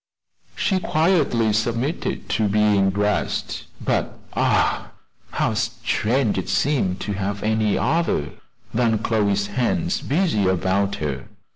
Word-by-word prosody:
She 190 -2 +1
quietly 155 - +2
submitted 120 +8 -1
to 110 +1 +1
being 100 -1 +3
dressed; 105 +1 -1
but, - - -1 0.2
ah! - - +1 0.4
how - - +1
strange 115 -2 0
it 95 - -5
seemed 120 -11 +1
to 105 - -2
have 100 +1 -3
any 110 -1 +1
other 145 - 0 0.4
than 115 -1 +2
Chloe's 105 -2 +1
hands 170 - -1
busy 140 - +1
about 95 +2 +1
her! 70 -3 -4
110 Hz, 115 wpm, -22 LUFS, 100-130 Hz, 0.4 s, being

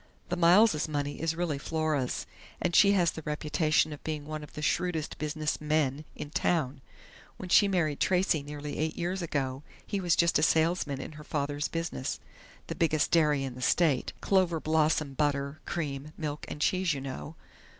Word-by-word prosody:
"The 180 - 0
Miles' 175 0 +5
money 145 -1 -3
is 165 0 0
really 165 -5 -1
Flora's, 155 -4 -1 0.3
and 175 -1 0
she 200 0 +7
has 175 -4 +3
the 160 - -7
reputation 155 +1 +1
of 145 - -11
being 155 -2 -4
one 155 0 -5
of 150 - -11
the 150 - -6
shrewdest 165 -1 -1
business 155 0 -2
'men' 150 -1 0
in 145 - -7
town. 145 -5 0 0.6
When 185 - -7
she 205 - +6
married 165 -7 0
Tracey 180 -4 +2
nearly 145 0 -6
eight 155 0 -1
years 180 +2 -2
ago, 135 -5 -2 0.2
he 200 - -2
was 175 -3 +3
just 170 -3 +3
a - - +1
salesman 160 -3 +2
in 135 - -6
her 150 0 -11
father's 145 0 -2
business 165 -5 -3 0.5
the - - -4
biggest 155 -2 +1
dairy 150 -4 +3
in 135 -2 -4
the 125 - -10
state... 145 0 +2
'Cloverblossom' 160 -6 +1
butter, 140 0 0
cream, 150 -2 -4
milk 150 -2 -4
and 150 - -7
cheese, 185 -1 +2
you 135 - -5
know.... 135 +4 -6
155 Hz, 175 wpm, -29 LUFS, 145-170 Hz, 0.6 s, she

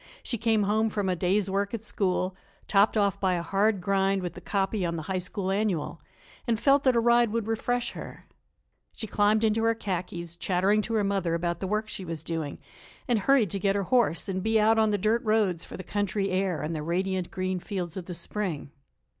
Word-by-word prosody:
She 235 - -2
came 225 -2 +2
home 215 +2 +2
from 205 -3 -1
a 180 - +1
day's 185 +3 +1
work 200 +3 -1
at 220 - -7
school, 185 -3 -1 0.3
topped 205 +2 +4
off 200 -2 +2
by 190 -2 +2
a 170 -1 -1
hard 200 +3 +1
grind 195 0 +1
with 175 -2 -4
the - - -10
copy 195 0 -1
on 170 -1 -1
the 160 - -4
High 185 +3 -2
School 190 +1 -3
Annual, 195 -5 -1 0.5
and 230 -2 +1
felt 275 +2 +4
that 260 -2 +4
a - - +4
ride 235 -1 +4
would 230 -1 -1
refresh 240 +2 -1
her. - - -9 0.7
She 225 - -4
climbed 215 +1 +2
into 220 0 +2
her 230 0 +3
khakis, 175 -4 -4
chattering 195 +4 +2
to 230 - -2
her 215 - +2
mother 195 -4 0
about 170 0 -2
the 190 - -3
work 215 +2 -1
she 195 - -6
was 165 -3 -5
doing, 160 -3 -3 0.5
and 240 -4 +2
hurried 230 -3 +3
to 200 - -2
get 195 +1 +1
her 200 - 0
horse 220 -5 +2
and 190 -1 -2
be 220 +2 +2
out 220 +1 +4
on 220 -1 +4
the 205 - +1
dirt 215 +4 +1
roads 210 -6 +1
for - - -9
the 185 - -7
country 200 0 -1
air 185 -5 0
and 160 +2 -3
the 155 - -3
radiant 185 +3 -1
green 185 -1 -2
fields 180 -3 -4
of 185 -3 -6
the 180 - -5
spring. 170 -4 -3
195 Hz, 220 wpm, -27 LUFS, 180-220 Hz, 0.7 s, topped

